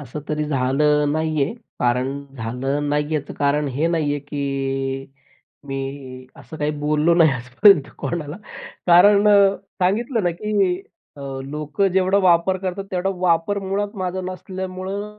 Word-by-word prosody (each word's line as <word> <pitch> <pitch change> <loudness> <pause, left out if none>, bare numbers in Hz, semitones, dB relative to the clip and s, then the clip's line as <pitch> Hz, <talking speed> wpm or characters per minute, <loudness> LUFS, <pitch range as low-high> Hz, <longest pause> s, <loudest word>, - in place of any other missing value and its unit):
असं 145 +1 -7
तरी 150 0 -1
झालं 145 +2 +2
नाहीये, 155 -1 0 0.3
कारण 130 +3 0
झालं 135 +5 -2
नाहीये 150 +1 0
याचं 145 -1 -3
कारण 145 +1 +1
हे 140 +5 -1
नाहीये, 155 -4 0
की 135 -1 -3 0.6
मी 135 -1 -6
असं 160 - -11
काही 150 0 0
बोललो 150 +3 +2
नाही 165 -2 +5
आजपर्यंत 135 - +4
कोणाला. 155 -2 -4 0.5
कारण 200 +4 +6
अ, 200 -1 +5 0.3
सांगितलं 225 +5 +1
ना, 175 - +2
की 195 0 0 0.4
अ, - - -11 0.2
लोकं 150 +7 -1
जेवढा 190 +1 +3
वापर 185 0 +3
करतात 190 +1 -4
तेवढा 185 +1 -1
वापर 180 +3 +1
मुळात 200 +2 -3
माझा 185 -1 -3
नसल्यामुळं 190 +3 -6
155 Hz, 135 wpm, -21 LUFS, 140-190 Hz, 0.6 s, कारण